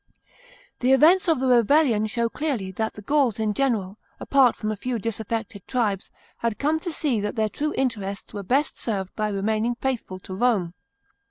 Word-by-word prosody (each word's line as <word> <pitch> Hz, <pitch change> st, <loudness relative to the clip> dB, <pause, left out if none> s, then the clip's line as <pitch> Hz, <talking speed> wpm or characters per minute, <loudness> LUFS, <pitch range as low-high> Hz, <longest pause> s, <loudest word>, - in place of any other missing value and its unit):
The 255 Hz, +2 st, +3 dB
events 335 Hz, +7 st, +5 dB
of 320 Hz, -5 st, +3 dB
the 265 Hz, -, 0 dB
rebellion 245 Hz, -2 st, +4 dB
show 235 Hz, +2 st, 0 dB
clearly 235 Hz, -8 st, -3 dB
that 220 Hz, +4 st, -2 dB
the 210 Hz, -, -10 dB
Gauls 275 Hz, -2 st, +2 dB
in 215 Hz, -1 st, 0 dB
general, 215 Hz, -6 st, -1 dB, 0.2 s
apart 265 Hz, -4 st, +4 dB
from 215 Hz, -1 st, -3 dB
a -, -, -2 dB
few 245 Hz, +4 st, -3 dB
disaffected 220 Hz, -2 st, -4 dB
tribes, 215 Hz, -6 st, -1 dB, 0.3 s
had 230 Hz, -3 st, -2 dB
come 305 Hz, +5 st, +1 dB
to 345 Hz, +1 st, -4 dB
see 285 Hz, -7 st, 0 dB
that 205 Hz, 0 st, -3 dB
their 220 Hz, -1 st, +1 dB
true 300 Hz, +7 st, -3 dB
interests 205 Hz, -7 st, -2 dB
were 205 Hz, -, -4 dB
best 270 Hz, +9 st, 0 dB
served 195 Hz, -5 st, -3 dB
by 215 Hz, -1 st, 0 dB
remaining 215 Hz, +4 st, 0 dB
faithful 245 Hz, -7 st, -3 dB
to 185 Hz, -, -8 dB
Rome. 195 Hz, -5 st, +1 dB
230 Hz, 180 wpm, -24 LUFS, 205-265 Hz, 0.3 s, events